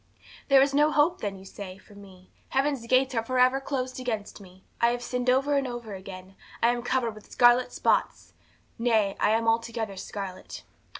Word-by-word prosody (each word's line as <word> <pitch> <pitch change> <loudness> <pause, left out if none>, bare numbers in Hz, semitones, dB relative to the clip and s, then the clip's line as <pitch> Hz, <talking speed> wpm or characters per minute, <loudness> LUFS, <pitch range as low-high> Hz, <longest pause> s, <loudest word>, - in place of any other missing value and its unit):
'There 270 -1 +6
is 275 0 -1
no 295 +2 +4
hope, 305 +4 +2
then, 200 -2 -3
you 190 - -13
say, 190 -1 -9
for 205 - -19
me; 190 -2 -16 0.2
heaven's 270 -3 -1
gates 260 +2 +3
are 225 -2 0
for 255 +3 -2
ever 255 +2 +4
closed 255 -2 -3
against 220 -5 -4
me. 185 -1 -16 0.2
I 235 - +5
have 240 +1 -1
sinned 250 +1 -2
over 275 +3 +2
and 275 -1 +1
over 240 -4 -6
again. 190 0 -10 0.3
I 235 - +6
am 240 0 -1
covered 240 -2 -1
with 215 -1 -15
scarlet 245 +1 +4
spots, - - 0 0.5
nay, 220 -4 +2
I - - +3
am 225 +1 +1
altogether 225 -2 -1
scarlet. 190 -1 -7
235 Hz, 190 wpm, -27 LUFS, 205-255 Hz, 0.5 s, There